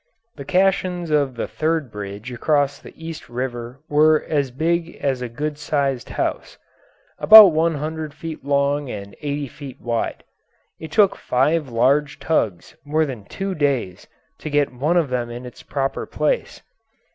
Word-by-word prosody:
The 140 - -9
caissons 180 -1 +1
of 140 -4 +1
the 115 - -3
third 155 -5 -1
bridge 105 +3 -7
across 140 +2 +1
the - - -12
East 165 -4 -8
River 120 +1 -5
were 155 +1 +4
as 140 -3 0
big 165 +5 -1
as 135 -3 -2
a 125 - -4
good 150 +5 -4
sized 140 -4 -1
house - - -3 0.6
about 215 -3 +10
one 160 +1 +1
hundred 155 +1 -4
feet 160 0 -8
long 140 0 +1
and 100 -2 -7
eighty 145 -1 -3
feet 135 +1 -10
wide. 115 -1 -3 0.6
It 160 -1 -8
took 205 -1 +4
five 145 +3 +1
large 135 +5 +2
tugs 110 - -1
more 155 +2 +1
than 125 -8 -7
two 195 - -4
days 140 - -1 0.3
to 155 - -5
get 145 -2 +1
one 150 +8 +1
of 160 -5 +2
them 120 -2 -1
in 120 +1 -7
its 125 - -11
proper 135 -1 -3
place. - - -2
145 Hz, 160 wpm, -21 LUFS, 125-160 Hz, 0.6 s, about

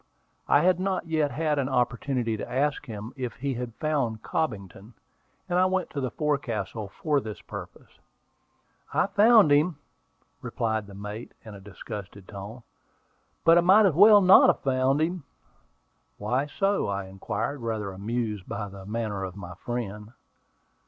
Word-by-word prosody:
I - - +5
had 180 0 +3
not 190 -1 -1
yet 155 -3 0
had 150 +2 -1
an 135 -1 -1
opportunity 125 -1 0
to 105 - -7
ask 145 +3 0
him 110 +1 -7
if 125 -4 -5
he 140 +1 -3
had 120 -2 -5
found 135 -8 -1
Cobbington, 105 - -4 0.5
and 180 -1 +1
I 185 - +4
went 185 0 -1
to 140 - -3
the 130 - -1
forecastle 115 -9 -2
for 145 +9 -1
this 110 -3 -7
purpose. - - -10 1.0
"I - - +3
found 205 -3 +5
him," 150 +2 +3 0.6
replied 110 -2 -2
the 100 - -12
mate, 105 +3 -7
in 110 - -9
a 100 - -10
disgusted 100 0 -9
tone. 105 +4 -9 0.8
"But 165 +1 +7
I - - +4
might 195 +5 +6
as 185 - +3
well 205 +5 +8
not 185 0 +8
have - - +2
found 135 +2 +1
him." 170 0 -1 0.9
"Why 125 +7 -1
so?" 195 +7 0
I 100 -1 -3
inquired, 100 +8 -4
rather 110 -4 -3
amused 105 0 -4
by 105 0 -4
the 95 0 -11
manner 105 -3 -3
of 95 -1 -6
my 90 -3 -8
friend. 105 +1 -6
125 Hz, 160 wpm, -26 LUFS, 105-155 Hz, 1.0 s, well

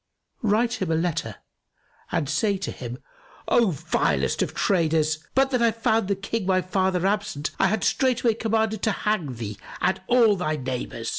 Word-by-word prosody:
Write 225 +2 +1
him 185 - -1
a - - +2
letter 165 0 -1 0.8
and 145 - 0
say 195 +7 +1
to 195 - -4
him 120 -1 -7 0.5
'O 235 -4 +4
vilest 75 - 0
of - - -2
traders, 160 -4 +1 0.2
but 270 +1 +3
that 250 -2 +1
I 235 - +5
found 225 -2 +1
the 200 - +1
King 200 +1 -3
my 185 -1 +3
father 185 -1 0
absent, 200 -7 -1
I - - +4
had 220 -1 0
straightway 250 -3 +2
commanded 220 -1 0
to 220 - +2
hang 175 - 0
thee 110 -3 -6 0.2
and 185 - 0
all 235 -4 +5
thy 155 -4 -1
neighbours. 125 -4 -4
195 Hz, 170 wpm, -24 LUFS, 155-220 Hz, 0.8 s, I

